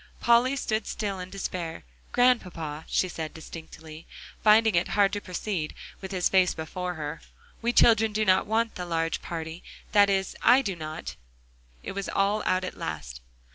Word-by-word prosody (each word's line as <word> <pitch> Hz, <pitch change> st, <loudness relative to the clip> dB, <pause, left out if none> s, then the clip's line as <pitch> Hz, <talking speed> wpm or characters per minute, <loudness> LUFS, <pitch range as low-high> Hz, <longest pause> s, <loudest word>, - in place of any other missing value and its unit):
Polly 240 Hz, +3 st, +4 dB
stood 220 Hz, -5 st, -2 dB
still 200 Hz, -3 st, -3 dB
in 180 Hz, 0 st, -6 dB
despair. 185 Hz, -4 st, -5 dB, 0.3 s
"Grandpapa," 175 Hz, -11 st, +1 dB
she 185 Hz, -, +1 dB
said 160 Hz, -3 st, -6 dB
distinctly, 160 Hz, 0 st, -10 dB, 0.4 s
finding 220 Hz, 0 st, +6 dB
it 170 Hz, +1 st, +2 dB
hard 200 Hz, -1 st, +4 dB
to 205 Hz, -, -2 dB
proceed, 180 Hz, -4 st, -4 dB, 0.3 s
with 190 Hz, -, -6 dB
his 185 Hz, -2 st, +1 dB
face 185 Hz, -2 st, +3 dB
before 180 Hz, +3 st, -4 dB
her, 150 Hz, 0 st, -5 dB, 0.4 s
"we 235 Hz, +1 st, +1 dB
children 225 Hz, -2 st, +5 dB
do 215 Hz, +1 st, 0 dB
not 190 Hz, +1 st, +3 dB
want 225 Hz, +1 st, +1 dB
the 180 Hz, -, -5 dB
large 165 Hz, -1 st, -1 dB
party; 165 Hz, 0 st, -6 dB, 0.3 s
that 205 Hz, -1 st, +6 dB
is 195 Hz, -1 st, 0 dB
I 255 Hz, +3 st, +6 dB
do 195 Hz, -6 st, -2 dB
not." 155 Hz, 0 st, -6 dB, 0.7 s
It -, -, -5 dB
was 200 Hz, 0 st, -4 dB
all 200 Hz, +2 st, +1 dB
out 185 Hz, 0 st, +2 dB
at 185 Hz, -, -5 dB
last. 65 Hz, -7 st, -5 dB
185 Hz, 170 wpm, -27 LUFS, 165-210 Hz, 0.7 s, finding